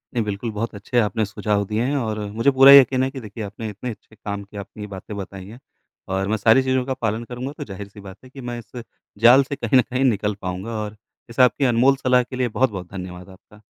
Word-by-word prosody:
नहीं, 115 - +1
बिल्कुल 105 +2 -4
बहुत 110 +2 -4
अच्छे 115 +5 -1
आपने 110 0 0
सुझाव 105 0 -1
दिए 105 +3 -1
हैं 135 +3 0
और 110 -4 -2
मुझे 115 +6 +2
पूरा 135 +1 +8
यकीन 130 -2 +7
है 130 - 0
कि 135 - -7
देखिए 110 +1 -7
आपने 105 +2 -6
इतने 105 +5 -6
अच्छे 110 -1 -11
काम 100 -1 -5
की 100 +1 -13
अपनी 105 +1 -8
बातें 100 +1 -8
बताई 95 -1 -7
हैं 115 +4 -12 0.5
और 95 0 -1
मैं 110 +2 0
सारी 110 +5 +4
चीज़ों 130 -1 0
का 135 - -1
पालन 115 -2 -2
करूँगा 125 +3 -6
तो - - -5
ज़ाहिर-सी 100 +1 -9
बात 100 0 -11
है 130 - -14
कि 135 +1 -11
मैं 120 - -4
इस 120 +3 -10 0.4
जाल 130 +3 +8
से 140 +1 -5
कहीं 120 0 +2
न - - +7
कहीं 130 +1 -2
निकल 105 -5 +1
पाऊँगा 95 +4 -4
और 105 0 -6 0.3
इस 115 - -9
आपकी 125 +2 +4
अनमोल 125 +2 +4
सलाह 125 -1 +2
के 130 - -9
लिए 125 -1 0
बहुत-बहुत 105 -7 -1
धन्यवाद 90 -1 -8
आपका। 100 +3 -18
110 Hz, 240 wpm, -22 LUFS, 100-125 Hz, 0.5 s, पूरा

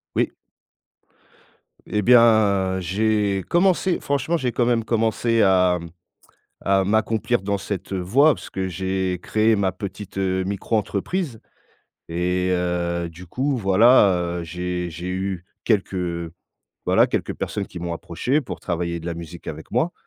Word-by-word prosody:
Oui. - - +1 1.5
Et 105 - -1
bien, 105 -5 +4
j'ai 100 +1 0
commencé 180 0 +2
franchement 145 +4 -1
j'ai 125 -5 -1
quand 120 +1 +1
même 120 -2 +2
commencé 115 0 +1
à 90 -2 +4
mmh, 85 - -8 0.8
à 95 0 +2
m'accomplir 110 +3 +1
dans 100 +1 -1
cette, 95 -1 -5
heu, 95 - -1
voie 135 - +4
parce - - -11
que 95 0 -3
j'ai 95 0 -2
créé 110 0 +2
ma 95 -2 +1
petite, 95 +1 -7
heu, 95 -1 0
micro 100 +3 -1
entreprise 110 - -2 0.7
et 90 +2 0
heu, 85 -1 -1
du 90 +3 -12
coup 135 - -1
voilà, 95 -4 +4
heu, - - -5
j'ai 90 +1 -3
j'ai 85 +3 -7
eu 95 -1 -3 0.2
quelques, 100 -4 +1 0.9
voilà, - - +4
quelques - - -2
personnes 100 -2 -3
qui 90 - -9
m'ont 85 0 -4
approché 125 - -1
pour 130 - -7
travailler 85 -1 -2
de 85 - -9
la 85 - -2
musique 85 0 -9
avec 80 +1 -7
moi. 170 +2 +1
95 Hz, 150 wpm, -22 LUFS, 90-110 Hz, 1.5 s, bien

